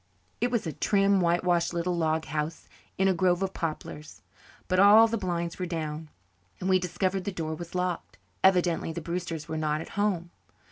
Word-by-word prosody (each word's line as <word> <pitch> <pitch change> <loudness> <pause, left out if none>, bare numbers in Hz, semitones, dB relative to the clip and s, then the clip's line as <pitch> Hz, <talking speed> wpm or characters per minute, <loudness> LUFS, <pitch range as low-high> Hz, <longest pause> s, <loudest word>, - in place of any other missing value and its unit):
It 245 - +1
was 235 -5 -1
a 160 - -3
trim, 200 -1 +2
white 170 0 +2
washed 175 -1 +1
little 175 +1 0
log 160 -1 0
house 150 +2 -4 0.3
in 190 - +3
a 190 - +4
grove 180 +1 +2
of 190 - -2
poplars. 155 -2 -6 0.4
But 185 0 +1
all 210 +3 +8
the 230 - -1
blinds 175 -4 -3
were 180 - -2
down 155 -2 -4 0.5
and 185 - -3
we 185 -1 +4
discovered 185 +1 -1
the 200 - -3
door 160 -3 -3
was 170 +2 -8
locked. 180 - -2 0.3
Evidently 180 -3 +3
the 165 - -4
Brewsters 170 -2 -4
were 160 -1 -3
not 155 -1 0
at 160 - -7
home. 190 -4 -1
175 Hz, 190 wpm, -28 LUFS, 165-190 Hz, 0.5 s, all